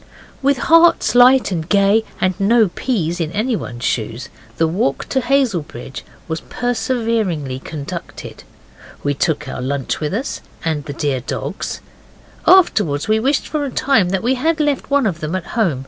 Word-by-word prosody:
With 280 0 +2
hearts 330 +6 +4
light 250 -2 +6
and 165 -2 -3
gay, 200 +2 +4 0.2
and 185 0 +1
no 215 +1 +4
peas 175 -6 -2
in 160 -1 -2
anyone's 205 - -2
shoes, 115 +3 -2 0.3
the 165 - +2
walk 160 -5 -1
to 265 - +1
Hazelbridge 200 - -1 0.3
was 160 -1 -3
perseveringly 225 - -1
conducted. 155 +4 -8 0.6
We 145 - +1
took 145 +2 -1
our - - -5
lunch 135 0 -2
with 155 +4 -2
us, 255 +5 -3 0.2
and 155 -3 -1
the 145 - -5
dear 140 -3 -1
dogs. 125 - -5 0.7
Afterwards 205 - +4
we 215 0 +3
wished 270 +5 0
for 305 -2 -2
a 280 - -2
time 250 -8 +2
that 190 0 -1
we 250 +3 +2
had 315 +5 0
left 290 -3 0
one 280 -1 +2
of 180 -6 -1
them 155 +3 -3
at 185 -2 -3
home. 190 - +1
195 Hz, 165 wpm, -18 LUFS, 150-250 Hz, 0.7 s, light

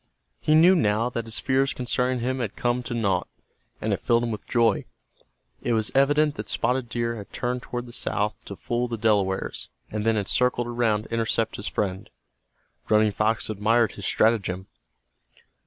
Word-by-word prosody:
He 155 - +3
knew 175 +4 +7
now 115 - +1
that 115 -2 -3
his 115 0 -3
fears 135 0 +1
concerning 125 0 -1
him 130 +2 -1
had 115 -5 -3
come 120 0 0
to 120 0 -5
nought, 100 -6 0 0.5
and - - -1
it - - -1
filled 120 0 +2
him 120 - -1
with 105 - -6
joy. 115 -4 +2 0.8
It 120 - 0
was 110 -1 0
evident 145 +2 +3
that - - -6
Spotted 125 +1 0
Deer 115 0 -2
had 100 - -10
turned 125 +1 -2
toward 120 -1 -5
the 120 - -12
south 105 0 -2
to 100 - -7
fool 120 +5 -2
the 115 -1 -4
Delawares, 100 -4 0 0.2
and 105 0 -2
then 115 0 +2
had 105 -2 -1
circled 125 -1 +1
around 120 -3 0
to 115 - -10
intercept 115 0 0
his 100 - -5
friend. 95 -2 -2 0.8
Running 110 0 +4
Fox 110 +2 +1
admired 110 +2 +2
his - - -5
stratagem. 95 -5 +1
115 Hz, 180 wpm, -25 LUFS, 105-125 Hz, 0.8 s, knew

